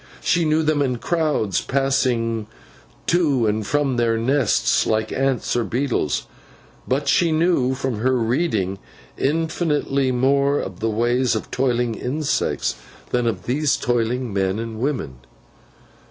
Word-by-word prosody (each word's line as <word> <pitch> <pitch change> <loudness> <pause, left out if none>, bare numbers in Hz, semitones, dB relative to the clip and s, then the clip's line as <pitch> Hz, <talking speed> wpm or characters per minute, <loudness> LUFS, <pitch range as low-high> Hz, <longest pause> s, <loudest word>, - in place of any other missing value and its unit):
She 170 -1 +2
knew 155 +1 +2
them 155 -1 +1
in 130 -3 0
crowds 150 - 0
passing 120 -5 0 0.6
to 150 -9 +2
and 105 -1 -1
from 145 -4 +1
their 115 -1 +2
nests, 135 +5 +2
like 110 0 0
ants 135 -1 0
or 120 - +1
beetles. 120 - -1 0.6
But 135 +3 0
she 170 -2 +3
knew 155 -6 +2
from 130 -5 -3
her 130 +3 +2
reading 115 - 0 0.4
infinitely 150 -3 0
more 140 +3 +2
of 95 -2 -6
the 115 - 0
ways 120 +3 +1
of 110 - -5
toiling 125 -2 0
insects 140 +7 -1 0.3
than 125 -1 +1
of 115 - -2
these 140 +3 +1
toiling 120 -1 -1
men 95 0 0
and 115 -1 -5
women. 120 - -2
125 Hz, 135 wpm, -22 LUFS, 115-145 Hz, 0.6 s, she